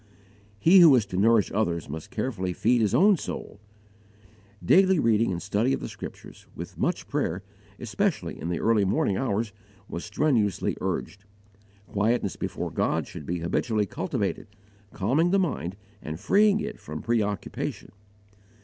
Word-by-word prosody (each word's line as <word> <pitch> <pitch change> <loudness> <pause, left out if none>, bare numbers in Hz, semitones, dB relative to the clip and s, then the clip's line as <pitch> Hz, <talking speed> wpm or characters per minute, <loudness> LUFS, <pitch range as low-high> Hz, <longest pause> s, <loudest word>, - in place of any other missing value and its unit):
He 170 - +6
who 165 -6 +8
is 115 -5 +2
to 90 - -7
nourish 110 +2 +3
others 85 -6 -1
must 80 +2 -7
carefully 105 -6 -3
feed 120 +5 +2
his 105 -3 +2
own 200 0 +5
soul. 100 - -7 1.1
Daily 190 0 +5
reading 115 -6 +2
and 85 - -2
study 105 +8 0
of - - -1
the - - -5
Scriptures, - - -10
with - - -8
much - - -1
prayer, 90 +4 -2 0.4
especially 125 - -2
in 85 - -3
the 85 - -1
early 110 -2 +3
morning 95 0 +1
hours, 110 -3 -1 0.3
was 85 - -6
strenuously 105 - 0
urged. 100 +1 -4 0.6
Quietness 105 0 0
before - - -4
God - - 0
should 75 - -10
be 85 0 -2
habitually 105 +5 0
cultivated, - - -3 0.4
calming 135 - +1
the 195 - +3
mind 125 - -1 0.3
and 80 +1 -6
freeing 210 - +4
it 210 - -5
from 75 +1 -7
preoccupation. 105 -5 -2
105 Hz, 150 wpm, -26 LUFS, 95-130 Hz, 1.1 s, who